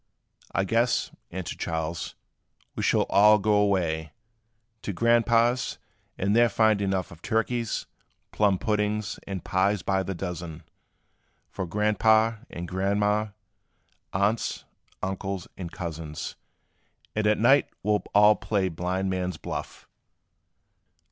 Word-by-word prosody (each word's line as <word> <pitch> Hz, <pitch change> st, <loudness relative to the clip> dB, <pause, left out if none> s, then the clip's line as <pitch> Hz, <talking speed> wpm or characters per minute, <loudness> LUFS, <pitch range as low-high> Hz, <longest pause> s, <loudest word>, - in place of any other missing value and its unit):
"I 95 Hz, -, +1 dB
guess," 115 Hz, +4 st, +1 dB, 0.2 s
answered 95 Hz, -1 st, -6 dB
Charles, 80 Hz, 0 st, -3 dB, 0.6 s
"we -, -, -3 dB
shall -, -, +3 dB
all 105 Hz, +2 st, +6 dB
go 105 Hz, +1 st, +1 dB
away 85 Hz, -7 st, +1 dB, 0.7 s
To 100 Hz, -, -4 dB
Grandpa's; 115 Hz, +3 st, +2 dB, 0.4 s
and 100 Hz, +3 st, +1 dB
there 120 Hz, 0 st, +5 dB
find 110 Hz, -1 st, +3 dB
enough 95 Hz, -2 st, -1 dB
Of 85 Hz, -1 st, -13 dB
turkeys, 115 Hz, +1 st, -1 dB, 0.5 s
plum 100 Hz, -3 st, +2 dB
puddings, 105 Hz, -1 st, -1 dB
and 95 Hz, -2 st, -4 dB
pies 95 Hz, +1 st, +1 dB
by 95 Hz, -1 st, +1 dB
the 95 Hz, 0 st, -4 dB
dozens, 85 Hz, -2 st, -6 dB, 0.9 s
For 95 Hz, -, -4 dB
Grandpa' 110 Hz, +3 st, +3 dB
and 85 Hz, +1 st, -6 dB
Grandma', 105 Hz, +3 st, +1 dB, 0.8 s
aunts, 100 Hz, +4 st, 0 dB, 0.4 s
uncles 95 Hz, -1 st, -3 dB
and 85 Hz, -3 st, -6 dB
cousins; 80 Hz, -4 st, -6 dB, 0.8 s
And 105 Hz, 0 st, +1 dB
at 105 Hz, -, +3 dB
night 135 Hz, +5 st, +4 dB
we 105 Hz, -, +1 dB
'll 105 Hz, -, +2 dB
all 105 Hz, +1 st, +7 dB
play 95 Hz, -1 st, 0 dB
blind 90 Hz, +3 st, -2 dB
man's 90 Hz, -1 st, -2 dB
buff. -, -, -6 dB
100 Hz, 120 wpm, -26 LUFS, 90-105 Hz, 0.9 s, all